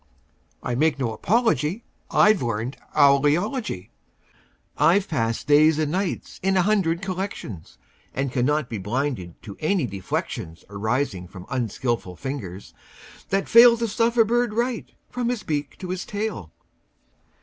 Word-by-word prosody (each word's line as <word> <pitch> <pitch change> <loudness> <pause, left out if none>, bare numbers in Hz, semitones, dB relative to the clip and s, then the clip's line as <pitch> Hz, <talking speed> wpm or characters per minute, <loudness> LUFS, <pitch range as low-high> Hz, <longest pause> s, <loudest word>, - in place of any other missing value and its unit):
I - - -2
make 155 +5 +2
no 120 -5 -1
apology; 195 - +1 0.3
I've 210 -1 +4
learned 115 +2 -2 0.2
owl 140 -2 +6
eology. 170 - -1 0.9
I've 175 +7 +3
passed 115 -8 -1
days 150 +1 +5
and 155 -2 0
nights 185 +1 -3
in 190 0 +2
a 185 - +4
hundred 190 -4 +1
collections, 185 - -5 0.3
And 135 0 -2
cannot 140 +2 +1
be 110 -4 -5
blinded 110 - -3
to 100 - -8
any 160 -1 +1
deflections 90 -5 -4
Arising 105 -2 -1
from 95 0 -11
unskilful 120 -5 -2
fingers 100 -7 -6 0.6
that 195 +1 0
fail 235 0 +8
To 230 0 -1
stuff 230 +3 0
a 225 - +6
bird 240 0 +1
right, 240 0 -1 0.2
from 245 -1 -1
his 245 -3 -2
beak 145 -2 -3
to 185 - -7
his 185 0 -3
tail. 205 - -4
150 Hz, 140 wpm, -24 LUFS, -, 0.9 s, fail